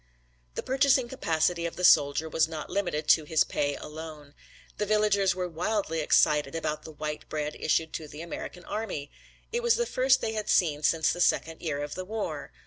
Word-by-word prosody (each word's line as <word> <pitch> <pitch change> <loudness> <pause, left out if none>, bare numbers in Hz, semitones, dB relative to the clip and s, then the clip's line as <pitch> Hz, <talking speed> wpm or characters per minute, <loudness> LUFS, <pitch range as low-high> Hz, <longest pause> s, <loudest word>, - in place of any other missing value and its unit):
The - - -3
purchasing 265 -1 +3
capacity 170 -7 0
of 165 - -8
the 180 - -6
soldier 145 -1 +5
was 160 0 +2
not 160 -2 -7
limited 175 -6 -1
to 160 - +6
his 155 +1 +3
pay 145 0 -1
alone. 150 -2 -9 0.5
The 210 - +1
villagers 205 -3 +2
were 180 -1 -2
wildly 175 0 -2
excited 150 -1 +3
about 155 -2 -2
the 160 - -10
white 150 0 -6
bread 150 -1 -3
issued 160 0 0
to 155 - -5
the 150 +2 -9
American 175 +1 -7
army. 195 -10 -4 0.4
It 475 +1 -1
was 475 -1 +3
the 475 - 0
first 260 - +3
they 220 - -2
had 215 -1 -3
seen 150 -5 +2
since 160 +1 +2
the 175 - -4
second 165 -1 +1
year 145 -3 -2
of 145 - -5
the 185 - -5
war. 195 - -4
165 Hz, 195 wpm, -28 LUFS, 150-210 Hz, 0.5 s, to